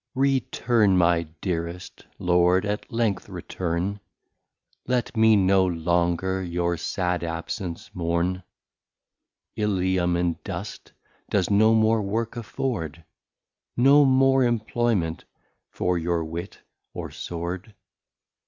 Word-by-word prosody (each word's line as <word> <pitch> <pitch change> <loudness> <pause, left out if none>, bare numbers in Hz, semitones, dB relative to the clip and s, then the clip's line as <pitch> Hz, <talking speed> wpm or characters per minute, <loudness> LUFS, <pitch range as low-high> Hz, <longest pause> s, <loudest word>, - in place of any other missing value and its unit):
Return 120 -6 +2
my 85 -2 +3
dearest 85 0 -4
Lord, 90 +1 +3
at 105 +4 -3
length 115 -4 -1
return, 90 +3 -3 0.9
Let 125 -2 -1
me 110 0 +5
no 95 -1 +4
longer 85 +2 0
your 85 -1 -1
sad 90 +1 -2
absence 85 +1 -5
mourn, 85 +1 -1 1.1
Ilium 95 -4 +1
in 85 -1 -1
Dust, - - -7 0.4
does 100 -1 +1
no 110 +2 +5
more 110 0 +3
Work 110 +4 -2
afford, 105 - -4 0.7
No 140 +4 +6
more 135 0 +4
Employment 115 -7 0 0.4
for 90 -1 -1
your 85 0 -1
Wit 85 +4 -7 0.4
or - - -5
Sword. 90 +5 -6
95 Hz, 100 wpm, -25 LUFS, 85-110 Hz, 1.1 s, No